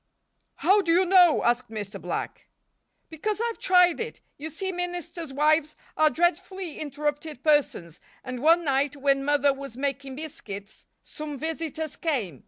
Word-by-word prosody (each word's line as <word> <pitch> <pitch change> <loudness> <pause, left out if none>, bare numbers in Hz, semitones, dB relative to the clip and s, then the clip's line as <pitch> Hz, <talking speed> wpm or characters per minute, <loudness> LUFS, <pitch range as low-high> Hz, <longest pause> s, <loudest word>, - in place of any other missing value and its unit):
"How 400 +2 +4
do 340 -3 0
you 360 +3 +4
know?" 360 -3 +5
asked 240 +1 +1
Mr. 210 -2 -6
Black. - - -5 0.6
"Because 415 +7 -2
I've 465 0 -2
tried 360 -2 +4
it. 460 0 -5 0.2
You 305 +3 -6
see, 380 +4 -3
ministers' 350 -3 -4
wives 305 +2 +2 0.2
are 310 0 +4
dreadfully 350 +3 -1
interrupted 295 -1 -4
persons, 265 - +1 0.2
and 255 -1 -5
one 330 +3 +5
night 280 -1 +1
when 275 -1 +1
Mother 285 0 +3
was 270 -3 -9
making 275 -1 -3
biscuits 210 -9 -8 0.2
some 300 -2 -7
visitors 315 -1 -4
came. 225 - -2
300 Hz, 145 wpm, -26 LUFS, 275-345 Hz, 0.6 s, know